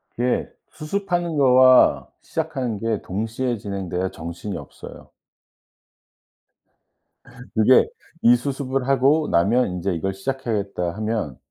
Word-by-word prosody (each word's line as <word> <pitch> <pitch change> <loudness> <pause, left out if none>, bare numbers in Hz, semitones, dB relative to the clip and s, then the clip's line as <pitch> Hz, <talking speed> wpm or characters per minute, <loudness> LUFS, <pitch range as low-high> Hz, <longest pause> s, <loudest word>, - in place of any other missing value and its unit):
그게 125 +1 0 0.2
수습하는 175 -1 -3
거와 130 -1 +5
시작하는 135 -9 -3
게 115 -1 -2
동시에 115 +5 -3
진행돼야 95 -2 -3
정신이 85 +5 -6
없어요. - - -12 2.5
그게 110 +4 +5 0.3
'이 120 +1 +6
수습을 135 0 -3
하고 140 +4 +3
나면 105 +9 +3
인제 90 +1 -2
이걸 95 +4 -2
시작해야겠다.' 100 -5 -3
하면 110 - -3
115 Hz, 250 characters per minute, -22 LUFS, 100-135 Hz, 2.5 s, 이